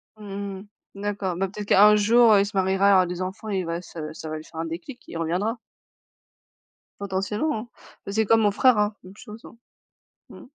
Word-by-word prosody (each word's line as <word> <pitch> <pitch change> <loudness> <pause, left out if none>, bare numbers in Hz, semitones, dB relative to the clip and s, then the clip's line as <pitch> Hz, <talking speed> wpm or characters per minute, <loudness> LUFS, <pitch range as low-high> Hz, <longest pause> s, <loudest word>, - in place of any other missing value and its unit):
Mmh 200 -2 -7
mh. 205 - -14 0.3
D'accord, 200 -3 -3
bah 195 +2 -1
peut-être 205 +2 -8
qu'un 210 +2 +7
jour, 220 0 +5
il 200 - +2
se 200 -1 -6
mariera, 190 +1 +3
il - - +6
aura 185 -1 +5
des 180 +1 -5
enfants 195 +4 -5
et 195 -2 -1
il 180 - -3
va 170 +1 -3
se 155 -3 -8
ça 160 0 -8
va 155 - -4
lui 155 - -9
faire 160 - -11
un 165 - -2
déclic 175 - -7
et - - -11
il 165 - -5
reviendra. 185 +8 -1 1.4
Potentiellement, 210 +6 -2 0.4
c'est 215 +2 0
comme 225 +2 +4
mon 205 -1 +3
frère 250 +2 +4
hein, 210 0 0
même 185 +2 -13
chose. 220 0 -12 0.9
Mmh. - - -13
200 Hz, 205 wpm, -24 LUFS, 185-210 Hz, 1.4 s, qu'un